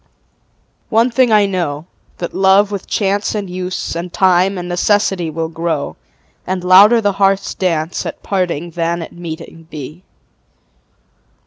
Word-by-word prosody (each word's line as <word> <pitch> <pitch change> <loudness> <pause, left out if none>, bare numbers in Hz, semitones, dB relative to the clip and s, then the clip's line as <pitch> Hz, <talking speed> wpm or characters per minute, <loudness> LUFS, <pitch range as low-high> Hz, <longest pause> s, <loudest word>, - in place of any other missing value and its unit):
One 230 +2 +3
thing 245 0 +3
I 210 -1 +5
know, 170 -6 -2 0.3
that 175 - -5
love 195 +2 +4
with 200 -2 -5
chance 205 +1 0
And 205 -2 -3
use 180 -1 -4
and 170 +1 -5
time 185 +1 +3
and 175 0 -5
necessity 180 -1 +1
Will 160 +1 -3
grow, 165 -2 -3 0.5
and 185 -1 -2
louder 200 +6 +7
the 205 -1 +2
heart's 195 0 +2
dance 165 -3 -1
At - - -7
parting 175 -4 -2
than 170 0 -2
at - - -11
meeting 165 -1 -9
be. 155 +4 -9
180 Hz, 140 wpm, -16 LUFS, 170-200 Hz, 0.5 s, louder